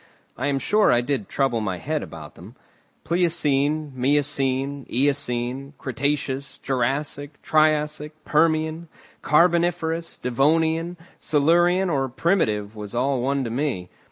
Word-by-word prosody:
I 130 - -2
am 140 -1 +1
sure 210 +9 +3
I 120 - +4
did 145 +10 -2
trouble 135 -5 0
my 95 -4 -2
head 85 - -2
about - - -9
them. - - -13 0.5
Pliocene, 155 -4 +1
miocene, 135 0 0
eocene, 135 0 -1
cretaceous, 140 +1 -2
jurassic, 140 +3 -2
triassic, 150 -1 +1
permian, 160 +1 +1 0.3
carboniferous, 170 0 +2
devonian, 160 +7 +1 0.2
silurian, 175 +5 +3
or 135 -3 0
primitive 110 - 0
was 105 +1 -7
all 130 +1 +1
one 135 +2 0
to 115 - -4
me. 120 -9 -2
145 Hz, 115 wpm, -23 LUFS, 130-160 Hz, 0.5 s, I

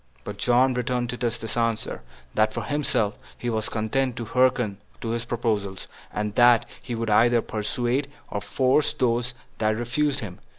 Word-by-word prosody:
But 100 +6 -6
John 125 +4 +4
returned 125 -1 -1
Titus 120 -1 -1
this 115 -1 -4
answer: 115 - -1 0.3
That 110 0 +2
for - - -2
himself 130 -7 0 0.2
he 120 - -2
was 110 -1 -1
content 120 +3 0
to 120 - -4
hearken 125 -4 +2 0.2
to 115 - -4
his 115 +1 -2
proposals, 105 -5 -2 0.2
and 105 0 -2
that 120 0 +6 0.2
he 120 - -4
would 115 -1 -1
either 120 +2 +5
persuade 120 +6 -1 0.2
or 100 - -2
force 130 +7 +2
those 120 0 0 0.2
that 110 0 +2
refused 135 +5 0
them. 95 -5 -7
120 Hz, 165 wpm, -25 LUFS, 110-125 Hz, 0.3 s, that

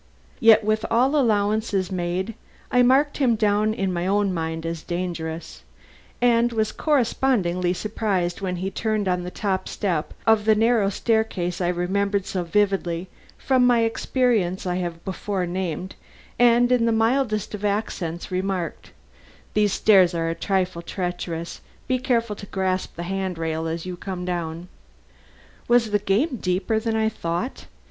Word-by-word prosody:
Yet 225 -1 +6
with 215 +1 +1
all 255 +5 +3
allowances 210 -6 +1
made 185 +4 -2 0.4
I 250 - +4
marked 270 +4 +3
him 250 -5 +3
down 210 0 +2
in 195 -3 -1
my 175 +1 -1
own 200 -1 +1
mind 160 -1 -3
as 165 -1 -3
dangerous, 170 -2 -5 0.6
and 240 -1 +3
was 220 -2 0
correspondingly 230 - +1
surprised 195 -3 -2
when 185 -2 -2
he 190 +2 -3
turned 215 0 -1
on 180 -1 +1
the 180 - -5
top 190 0 -2
step 175 -7 -2
of 220 -2 +4
the 220 0 +5
narrow 225 -2 +3
staircase 205 -5 -1
I 175 - +1
remembered 195 +3 0
so 185 -2 -2
vividly 185 -1 0 0.3
from 255 -2 +3
the 240 -2 +4
experience 225 -5 0
I 180 0 -1
have 170 -2 -4
before 190 0 -2
named, 180 0 -3 0.5
and 245 0 +5
in 240 -2 +3
the - - +3
mildest 225 -1 +1
of 210 -1 -6
accents 195 -5 -2
remarked: 185 -2 -3 0.6
"These 210 -2 +2
stairs 190 -5 +5
are 165 0 0
a - - 0
trifle 185 -1 -1
treacherous. 175 -2 -4 0.3
Be 255 0 +1
careful 235 -4 0
to 200 - -9
grasp 190 -1 -2
the 170 - -5
hand 190 0 -3
rail 160 0 -2
as 165 +1 -4
you 180 -1 -5
come 180 -1 -5
down." 170 -1 -4 1.0
Was 240 -2 +3
the 205 - +3
game 220 +8 +1
deeper 185 +3 0
than 225 0 -2
I 220 0 +2
thought? 220 +2 -4
195 Hz, 155 wpm, -23 LUFS, 180-225 Hz, 1.0 s, Yet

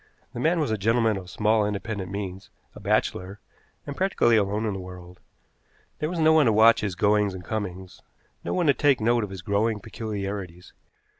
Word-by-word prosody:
The - - -6
man 165 +6 +2
was 145 -7 0
a 110 - -1
gentleman 115 +1 +2
of 95 -2 -7
small 105 +2 +2
independent 105 -2 -3
means, 95 -1 -6 0.2
a - - -11
bachelor, 95 +3 -1 0.5
and 145 - -6
practically 185 -11 +2
alone 105 +1 +1
in 105 - -1
the 95 - -5
world. 90 0 -11 0.8
There 155 - -1
was 175 - -4
no 160 -1 +4
one 155 -5 +5
to - - +4
watch 110 +2 +6
his 100 -4 -3
goings 105 0 +2
and 90 -1 -9
comings, 95 -4 -5 0.4
no - - -3
one 180 -2 0
to 140 - +5
take 140 0 +2
note 115 +1 +2
of 105 - -5
his 95 -2 -8
growing 105 +3 0
peculiarities. 100 -4 -6
105 Hz, 195 wpm, -25 LUFS, 95-115 Hz, 0.8 s, watch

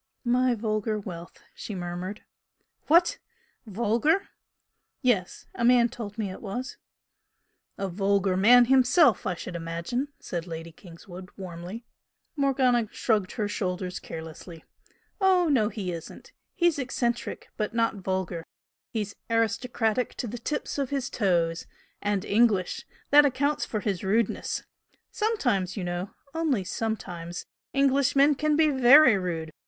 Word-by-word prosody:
"My 250 +1 +3
vulgar 215 -1 -1
wealth!" 175 -4 -9
she 210 - -7
murmured. 180 +3 -5 0.6
"What? 345 +10 +4 0.5
Vulgar?" 235 - +1 0.7
"Yes. 210 -8 0
A - - -3
man 240 0 +5
told 215 -2 -7
me 205 -4 -2
it - - -9
was." 245 +5 -5 1.0
"A 195 - -2
vulgar 195 0 +1
man 240 +6 +7
himself, 260 - +4
I 185 - -1
should 175 +1 -7
imagine!" 170 - -3
said 170 -1 -5
Lady 165 0 -7
Kingswood, 180 +2 -12
warmly. 185 +4 -7 0.5
Morgana 260 -5 +2
shrugged 210 -5 0
her 210 -3 -1
shoulders 185 -2 -3
carelessly. 160 +1 -9 0.5
"Oh, 370 -3 +4
no, 230 -7 +3
he 200 -6 -4
isn't. 165 -2 -9 0.2
He's 345 -5 +2
eccentric, 240 -2 -2
but 215 +1 -3
not 230 -2 +1
vulgar. 185 -3 -3 0.5
He's 210 -3 -4
aristocratic 230 +1 0
to - - -4
the 240 +1 -6
tips 295 +3 -3
of 275 -3 -1
his 275 -1 -2
toes 170 -5 0 0.3
and 205 -2 -1
English. 205 -4 +2 0.2
That 295 +1 +8
accounts 285 +2 +1
for 215 - -3
his 195 -5 -2
rudeness. 210 +3 0 0.5
Sometimes, 245 - 0
you 195 - -3
know 175 +2 -3 0.2
only 310 -11 0
sometimes 180 -5 -4 0.3
Englishmen 275 +1 +4
can 300 +2 +1
be 310 -1 +4
VERY 265 -1 +7
rude! 165 -3 -3
215 Hz, 130 wpm, -27 LUFS, 185-255 Hz, 1.0 s, That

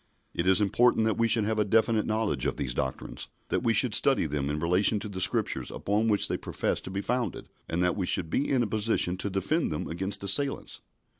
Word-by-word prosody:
It 85 - -2
is 95 +1 +4
important 110 +3 +3
that 110 0 -1
we 115 - +3
should 115 -1 +2
have 110 0 -1
a - - +4
definite 110 +1 +1
knowledge 110 - -1
of - - -3
these 65 -4 -3
doctrines; 65 +1 -4 0.2
that - - 0
we 115 - +1
should 115 +1 +1
study 135 -3 +4
them 70 -2 -2
in 75 - -2
relation 90 +6 +1
to 105 - -6
the 95 -2 -5
Scriptures - - +1
upon 105 +3 -1
which 105 -2 +4
they - - -2
profess - - -3
to - - -8
be 95 +1 -3
founded, 125 +2 -3 0.2
and 85 +2 0
that 90 - +1
we 95 -3 -2
should 90 -4 +1
be 145 - 0
in 130 -3 +2
a - - -2
position 105 -4 0
to 100 - -3
defend 100 - -1
them 75 - -4
against 95 +4 -3
assailants. 135 +8 +1
105 Hz, 230 wpm, -27 LUFS, 90-115 Hz, 0.2 s, is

